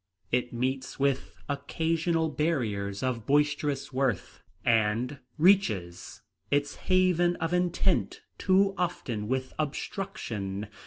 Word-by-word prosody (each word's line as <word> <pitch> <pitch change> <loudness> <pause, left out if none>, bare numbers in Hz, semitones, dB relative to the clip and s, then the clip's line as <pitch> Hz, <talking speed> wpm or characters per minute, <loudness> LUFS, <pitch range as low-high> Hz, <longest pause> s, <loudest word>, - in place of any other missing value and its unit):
It 125 0 +1
meets 130 +3 -2
with 135 -1 0
occasional 160 +3 0
barriers 110 -11 -1
of 120 -4 -2
boisterous 145 -1 +1
worth, 130 -7 -1 0.2
and 115 +4 +2 0.2
reaches 110 - +2 0.3
its 145 0 +1
haven 180 -2 +2
of 165 0 -2
intent 180 -1 +1 0.2
too 195 +1 +4
often 120 -12 -2
with 130 +1 -2
obstruction. 115 - -3
140 Hz, 100 wpm, -29 LUFS, 115-165 Hz, 0.3 s, too